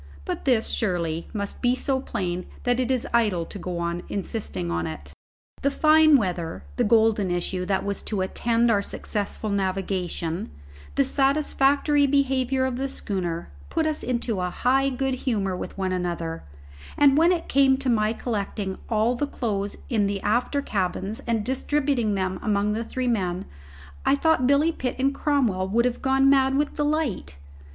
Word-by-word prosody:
But - - -4
this, 245 -5 +2
surely, 170 -5 -1
must 200 -2 -4
be 245 0 +3
so 265 0 0
plain 180 -6 -3 0.2
that 245 0 +1
it 255 -1 0
is 255 -2 +1
idle 210 -8 +2
to 200 - -9
go 180 -1 -4
on 170 0 -2
insisting 190 - -3
on 85 0 -1
it. 70 -2 -8 0.5
The 280 - +2
fine 310 +1 +5
weather, 175 -7 -3
the 245 - +3
golden 220 -3 +3
issue 180 +1 -2
that 195 -1 0
was 200 0 -2
to 205 -3 -1
attend 230 +5 +1
our 205 -2 +3
successful 210 +1 -3
navigation, 185 - -2 0.5
the 140 - +3
satisfactory 285 +1 +2
behaviour 265 -1 +1
of 255 -2 -2
the 270 +1 -2
schooner, 175 - -4 0.2
put 320 - 0
us 310 -1 -1
into 235 -5 -1
a 180 - -1
high 265 +7 +2
good 265 0 -1
humour 210 -7 -1
with 180 - -7
one 190 -1 -1
another; 170 -2 -3 0.5
and 280 -2 +6
when 330 +4 +5
it 345 -2 -1
came 270 -1 +4
to 270 0 -5
my 215 -3 +2
collecting 205 -4 -3
all 225 +1 +2
the 285 +4 -2
clothes 205 -7 -3
in 215 -5 +1
the 200 0 -2
after 245 +6 +1
cabins 195 0 -2
and 225 -3 0
distributing 265 -4 0
them 185 -1 -2
among 210 -1 +1
the 225 +2 -2
three 255 +2 -3
men, 185 -6 -1 0.6
I 275 - +4
thought 285 -4 +2
Billy 285 +4 +4
Pitt 255 -5 -3
and 270 +1 +1
Cromwell 245 -11 +1
would 235 +5 +2
have 250 -1 -1
gone 270 0 +3
mad 270 -1 +4
with 295 0 0
delight. 295 - -1
225 Hz, 170 wpm, -25 LUFS, 190-270 Hz, 0.6 s, and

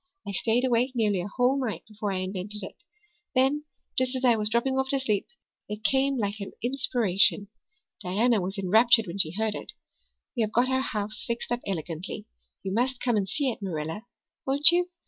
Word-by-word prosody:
I - - -3
stayed 230 +5 +1
awake 250 +1 +1
nearly 210 -5 +1
a 175 - -5
whole 255 +5 +1
night 225 -4 -4
before 210 -1 -4
I 185 -1 -2
invented 190 +2 -3
it. - - -10 0.5
Then, 270 +4 +2 0.3
just 255 0 +1
as 260 0 -1
I 240 -2 +5
was 210 -1 -1
dropping 265 +4 +1
off 265 0 -1
to 275 - +3
sleep, 215 -7 -1 0.4
it 210 +1 -6
came 270 +4 +2
like 205 -2 -2
an 200 - -7
inspiration. 225 -6 +2 0.5
Diana 215 +4 +1
was 190 +3 -4
enraptured 225 +4 +4
when 175 +3 -6
she 160 - +3
heard 220 -1 0
it. - - -7 0.6
We 240 - 0
have 215 0 -1
got 245 +2 +3
our 260 0 +1
house 210 -4 -3
fixed 235 0 -4
up 240 - 0
elegantly. 170 -1 -5 0.4
You 190 - -3
must 250 +3 0
come 245 -2 0
and 195 -2 0
see 270 +5 0
it, 220 - -9
Marilla 170 +4 -4 0.4
won't 285 +4 +8
you? 355 +1 +1
225 Hz, 195 wpm, -27 LUFS, 200-255 Hz, 0.6 s, won't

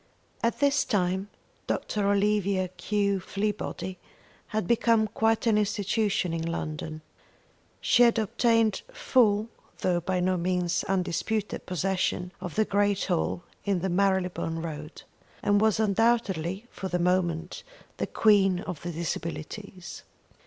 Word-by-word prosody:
At 230 - 0
this 280 -1 +3
time 190 -4 0 0.4
Dr. 205 -2 -1
Olivia 200 -2 +1
Q. 200 +2 0
Fleabody 200 -1 -3 0.5
had 215 -3 -2
become 230 -2 +3
quite 225 +1 +1
an 220 -2 +4
institution 205 -2 0
in 165 - -2
London. 155 -1 -4 0.8
She 245 - +4
had 235 -1 +6
obtained 225 0 +2
full 225 - +3 0.3
though 180 -2 +2
by 180 +2 -1
no 185 +1 +1
means 180 0 0
undisputed 195 +3 -1
possession 180 0 -1
of 180 -4 -6
the 220 - +3
great 205 -1 +1
hall 175 -1 -1 0.2
in 195 -4 0
the 190 - -1
Marylebone 180 -3 0
Road, 155 -1 -7 0.4
and 205 0 +3
was 220 -1 +3
undoubtedly 205 -3 +1
for 190 - -5
the 180 - -1
moment 175 -1 0 0.4
the - - -2
Queen 195 -4 +4
of 180 -7 -6
the 175 - -4
Disabilities. 170 +3 -5
195 Hz, 125 wpm, -27 LUFS, 180-215 Hz, 0.8 s, had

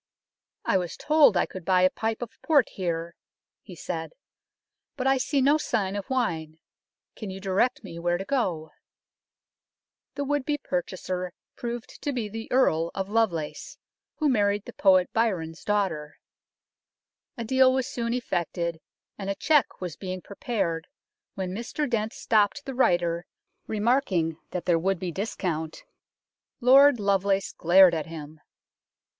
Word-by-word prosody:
" - - -54
I 190 - +3
was 175 -2 -5
told 300 - +5
I - - +3
could 185 - -9
buy 185 +1 +3
a 185 - +5
pipe 225 +1 -2
of 230 - -11
port 290 -7 +3
here," 170 -2 -3 0.5
he - - -12
said; - - -5 0.4
" - - -61
but 255 - -2
I 270 0 +3
see 275 +1 +1
no 290 +3 +4
sign 195 -8 -1
of 200 -1 -5
wine; 165 -12 -1 0.6
can 215 - -6
you 190 0 -6
direct 200 +7 0
me 170 -4 -8
where 175 +1 +1
to 195 - -6
go? 185 - -1 0.7
" - - -65
The 285 - -2
would 290 0 0
be 290 +2 -1
purchaser 180 -4 -3 0.2
proved 240 -1 -6
to 290 - -1
be 240 -5 -2
the 225 +2 -7
Earl 170 -11 +3
of 195 0 -3
Lovelace, 205 -9 -1 0.4
who 305 - 0
married 205 -5 +2
the - - -9
poet 185 -2 +4
Byron's 180 -8 -1
daughter. 185 -8 -1 1.2
A 235 - -3
deal 260 +2 +4
was 260 -1 0
soon 235 -1 -3
effected, 170 -8 -2 0.4
and 195 -1 -4
a 195 - -1
cheque 300 -4 +2
was 175 -3 -5
being 185 -1 -5
prepared 185 -6 -3 0.5
when 190 -2 -3
Mr 235 +8 -3
Dent 220 -3 -1
stopped 215 +5 +1
the 270 - -5
writer, 175 -8 +1 0.4
remarking 205 - +1
that 180 -1 -4
there 170 -2 +3
would 190 +3 0
be 175 0 -4
discount. 165 -5 -3 0.8
Lord 270 +1 +7
Lovelace 200 -1 +1
glared 180 +1 +6
at 160 -2 -2
him. 155 -1 -9
195 Hz, 155 wpm, -26 LUFS, 175-245 Hz, 1.2 s, Lord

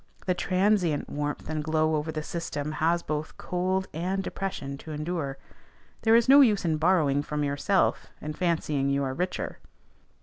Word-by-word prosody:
The 185 - +2
transient 185 -3 +1
warmth 145 0 -3
and 155 -1 -2
glow 155 0 +1
over 150 +1 -2
the 155 -1 -4
system 150 -3 -4
has 165 +3 +1
both 150 +1 -4
cold 185 +1 -1
and 185 +5 -1
depression 185 -10 -4
to 160 - -9
endure. 150 -2 -3 0.6
There 225 0 +5
is 235 +1 +4
no 280 +2 +9
use 215 -8 +4
in 160 -2 +1
borrowing 155 -4 +3
from 150 0 -3
yourself, 145 +7 +1
and 155 0 -5
fancying 155 -6 0
you 140 0 +1
are 130 -1 -2
richer. 180 +6 -3
160 Hz, 165 wpm, -27 LUFS, 150-185 Hz, 0.6 s, no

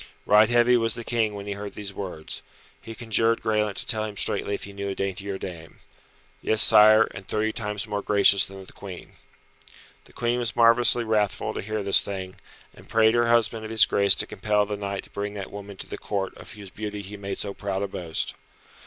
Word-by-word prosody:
Right 105 +1 +5
heavy 120 +1 +4
was 115 -2 +1
the 115 - -5
King 110 -3 -1
when 100 0 -7
he 100 - -4
heard 100 0 -8
these 100 -1 -5
words. 90 -5 -5 0.4
He 115 - -9
conjured 115 0 0
Graelent 105 -2 0
to - - -3
tell 110 -3 +1
him 105 -2 -6
straightly 100 - 0
if - - -8
he 100 - -9
knew 100 0 -5
a 95 - -4
daintier 95 0 -4
dame. 85 -4 -9 0.6
"Yes, 110 - +1
Sire, 110 +2 +7
and 90 +1 -10
thirty 110 +1 0
times 105 -2 -4
more 105 -2 -3
gracious 100 -1 +4
than 95 0 -10
the - - -15
Queen." 95 -3 -10 0.9
The - - -12
Queen 120 0 -1
was 120 -1 -2
marvellously 120 +1 +5
wrathful 105 -3 -1
to - - -4
hear 110 +1 -4
this 100 0 +5
thing, 95 -1 -6 0.4
and - - -17
prayed 110 0 +4
her 120 0 +2
husband 115 -1 +2
of 110 - -7
his 110 -1 +6
grace 100 -1 +5
to - - 0
compel 105 +1 0
the 105 0 -4
knight 100 -1 -5
to - - -17
bring 100 0 -5
that 100 -2 -7
woman 100 -1 -9
to - - -7
the - - -7
Court 100 -2 -3
of - - -11
whose 100 -3 -11
beauty 105 0 -6
he 100 +2 -9
made 100 -1 -6
so 100 - -5
proud 100 -1 -3
a - - -2
boast. 85 -4 -4
105 Hz, 220 wpm, -25 LUFS, 100-110 Hz, 0.9 s, Sire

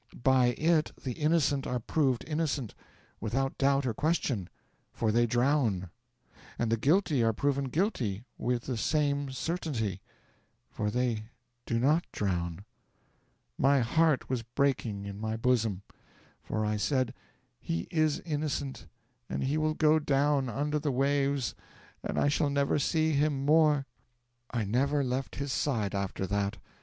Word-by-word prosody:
By 130 -2 +4
it 160 -1 +2
the 130 - -2
innocent 150 -1 +1
are 125 0 -1
proved 130 0 0
innocent, 150 -7 -1 0.5
without 135 +5 -2
doubt 140 0 +3
or 120 - 0
question, 130 - 0 0.4
for 110 -2 0
they 120 +2 +3
drown; 120 - +1 0.7
and 115 -1 0
the - - +4
guilty 150 - +2
are 115 0 +3
proven 140 +3 0
guilty 130 - -1
with 120 0 -1
the 125 -3 -3
same 145 +1 +1
certainty, 130 - -2 0.7
for 105 -1 -2
they 115 -1 -1 0.4
do 115 - 0
not 150 +8 +3
drown. 85 -1 -2 0.9
My 135 0 +4
heart 155 +4 +2
was 130 -2 -1
breaking 115 -4 -1
in 100 0 -6
my 110 0 -2
bosom, 115 -5 +1 0.6
for 110 0 -2
I 105 0 0
said, 130 +2 0 0.5
"He 85 0 -3
is 155 -2 +1
innocent, 150 -3 -3 0.4
and - - -2
he 135 +3 0
will 155 0 +1
go 155 0 +4
down 140 -2 +2
under 150 +4 -1
the 145 -1 -1
waves 140 0 +1 0.5
and - - -3
I - - +3
shall 145 0 +2
never 140 +1 +1
see 160 +2 +1
him 145 -2 +1
more." 150 -2 +4 0.6
'I 115 -3 -1
never 140 +7 +1
left 130 +1 -2
his 140 -2 -3
side 110 -9 0
after 100 -1 -2
that. 100 +2 -1
135 Hz, 145 wpm, -30 LUFS, 115-150 Hz, 0.9 s, By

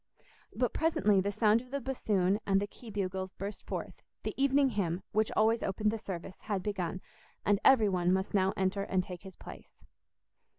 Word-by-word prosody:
But - - 0
presently 210 -12 +3
the 200 +2 -1
sound 215 +2 +3
of 255 - -15
the 280 +2 -2
bassoon 210 -7 +1
and 195 -1 +4
the 200 - -1
key 225 +3 -13
bugles 190 -2 -3
burst 200 +2 -6
forth; - - -5 0.2
the - - -3
evening 275 0 +3
hymn, 190 -5 -1
which 215 0 +1
always 225 +2 +3
opened 210 +2 0
the 225 - -3
service, 185 -2 -7
had 200 -4 -3
begun, 185 -3 -3 0.4
and 205 -1 +3
every 240 -6 +6
one 180 -2 +1
must 190 +1 0
now 190 -1 +3
enter 195 +1 0
and 190 -2 0
take 180 -1 -8
his 190 -2 -11
place. - - -13
200 Hz, 185 wpm, -31 LUFS, 190-220 Hz, 0.4 s, every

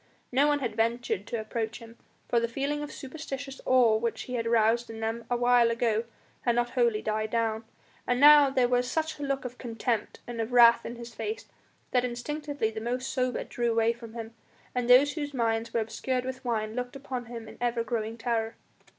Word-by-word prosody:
No 275 +4 +4
one 290 -1 +2
had 245 - -2
ventured 230 -3 0
to 235 - -3
approach 220 0 -3
him, 230 0 -13 0.3
for 235 - +3
the 235 - 0
feeling 280 +5 -2
of 295 - -5
superstitious 275 -1 -7
awe 250 -4 +5
which 230 +1 -2
he 250 - -7
had 230 -2 -1
aroused 230 +1 +3
in 225 0 -7
them 225 +1 -3
a 245 - +1
while 245 -1 +4
ago 230 -1 +1 0.4
had 240 -1 +1
not 240 0 +1
wholly 235 -4 +1
died 215 0 -1
down, 225 -1 -1 0.4
and 245 0 +1
now 295 0 +8
there 260 -2 +2
was 245 0 +1
such 315 +1 -2
a - - -4
look 275 -1 -2
of 250 0 -7
contempt 230 -2 -2
and 235 -1 -4
of 225 +2 -4
wrath 235 -1 +7
in 235 - -6
his 235 0 -9
face 445 - -4 0.5
that 250 -1 +3
instinctively 280 0 -3
the 220 0 -6
most 250 +3 -2
sober 255 -2 0
drew 240 -1 -2
away 230 0 +2
from 230 -1 -12
him, 225 -1 -6 0.4
and 245 -1 -1
those 275 +4 +7
whose 290 -3 -4
minds 230 -1 0
were 230 - +1
obscured 250 +4 -2
with 260 0 -5
wine 220 -3 -1
looked 250 +1 -4
upon 260 -3 -5
him 230 -2 -8
in - - -12
ever 240 -1 0
growing 225 0 -3
terror. 225 -1 -1
240 Hz, 210 wpm, -28 LUFS, 230-255 Hz, 0.5 s, now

